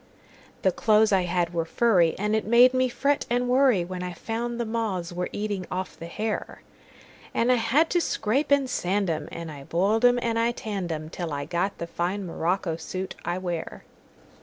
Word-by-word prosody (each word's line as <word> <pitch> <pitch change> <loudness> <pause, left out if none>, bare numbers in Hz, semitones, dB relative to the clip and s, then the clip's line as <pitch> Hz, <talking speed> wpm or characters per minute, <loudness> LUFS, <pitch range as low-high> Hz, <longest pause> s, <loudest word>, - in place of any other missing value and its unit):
The 190 - +4
clothes 215 +3 +3
I 190 -2 +3
had 175 -1 0
were 165 -1 0
furry, 175 -2 +3
And 210 +2 0
it 220 - +1
made 245 +3 +6
me 255 0 +2
fret 280 +3 0
and 245 +1 +1
worryWhen 235 -9 +2
I 180 0 -4
found 235 +5 -4
the 235 - 0
moths 210 -6 -2
were 180 +1 -3
eating 205 -3 -3
off 185 0 -4
the 165 - -8
hair; 215 +5 -4 0.7
And 235 +2 +3
I 250 - +4
had 255 +8 +2
to 350 - +3
scrape 265 0 0
and 280 -2 +3
sand 195 -5 0
'em, 155 - -4
And 170 -1 -6
I 140 -2 -9
boiled 195 - +1
'em 245 0 +6
and 230 -1 0
I 235 +1 +2
tanned 200 -7 -4
'em, 155 0 -5
Till 170 -3 -4
I 145 0 -3
got 175 +5 -1
the 170 - -4
fine 180 +4 -2
morocco 170 0 -1
suit 185 +2 -5
I 175 +1 -1
wear. 175 -3 -4
195 Hz, 195 wpm, -26 LUFS, 175-235 Hz, 0.7 s, made